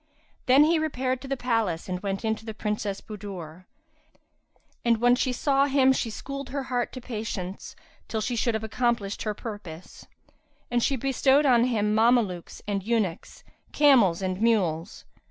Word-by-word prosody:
Then 265 +3 +7
he 320 +1 +3
repaired 260 -4 -1
to 270 - -8
the 275 0 -2
palace 225 -9 -1
and 180 -1 -3
went 195 +2 -3
in 220 - +2
to - - -14
the 220 -1 -7
Princess 210 -2 -3
Budur; 185 -5 -9 1.2
and 235 -1 +3
when 245 +1 +5
she 255 +1 0
saw 275 +2 +2
him 265 -1 +4
she 240 - -2
schooled 275 +4 -6
her 275 0 -3
heart 245 -1 0
to 255 - -6
patience, 215 -6 -5 0.3
till 220 - -2
she 240 +3 -2
should 235 0 0
have 220 - -3
accomplished 220 -2 -1
her 215 -1 -2
purpose; 205 -8 -9 0.6
and 240 0 +2
she 275 - +1
bestowed 270 +2 +2
on 245 -3 +5
him 210 -4 +1
Mamelukes 220 -6 +1
and 200 -1 -1
eunuchs, 205 -5 -2 0.3
camels 235 - +4
and 185 +1 -2
mules. 190 -6 0
225 Hz, 165 wpm, -26 LUFS, 200-255 Hz, 1.2 s, Then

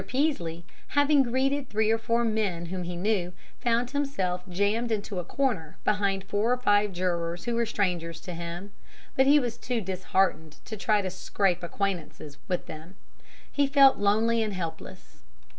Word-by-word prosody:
Peaslee, 175 - -1 0.3
having 285 0 +5
greeted 265 +2 0
three 220 +1 +2
or 225 - +2
four 230 +1 +1
men 205 -6 -1
whom 180 +2 -4
he 175 0 -4
knew, 180 -1 0 0.3
found 240 +1 +1
himself 275 -11 -1
jammed 205 +6 0
into 205 -3 -2
a - - -3
corner 210 - -2
behind 200 -2 +1
four 205 +4 0
or 250 - +3
five 205 -4 +3
jurors 175 -1 -2
who 240 - -2
were 235 0 +1
strangers 170 -6 -1
to 180 - -7
him, 170 +4 -6 0.4
but 265 0 +4
he 295 +2 +7
was 240 -3 -3
too 245 -2 -1
disheartened 185 -4 0
to 220 - -6
try 205 +1 +1
to 185 - -3
scrape 185 -1 0
acquaintance 180 -1 -3 0.3
with 180 -2 -2
them. 160 +5 -10 0.6
He 285 -1 +2
felt 275 -1 +6
lonely 220 +3 +3
and 215 -3 -2
helpless. 165 - -7
205 Hz, 165 wpm, -27 LUFS, 180-235 Hz, 0.6 s, he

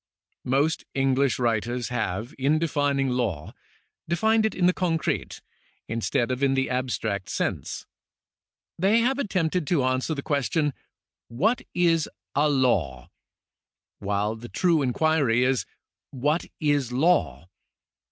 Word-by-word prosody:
Most 145 +5 +1
English 135 -1 +2
writers 120 0 -1
have, 115 - -3
in 140 +4 +3
defining 145 -4 0
law, 110 -12 -2 0.6
defined 220 +5 +3
it - - -6
in 180 - +1
the 180 - +5
concrete, 165 -4 -2 0.4
instead 115 +2 -1
of 130 +1 -3
in 135 -1 +3
the 135 -1 0
abstract 110 -6 -2
sense. - - -3 0.9
They 205 +6 +4
have 265 +4 +1
attempted 180 - 0
to 160 -7 +2
answer 130 +4 0
the 140 - -5
question: 145 0 0 0.3
" - - -68 0.2
What 230 +3 +3
is 165 -3 +2 0.2
a 150 +2 +3
law? 95 - 0 0.4
" - - -67
while 105 +2 -1
the 120 +2 -10
true 170 -4 +2
inquiry 135 -2 +2
is: 130 -1 +1 0.3
" - - -66
What 150 +6 0
is 145 -5 +1
law 90 - +1
135 Hz, 130 wpm, -25 LUFS, 120-160 Hz, 0.9 s, the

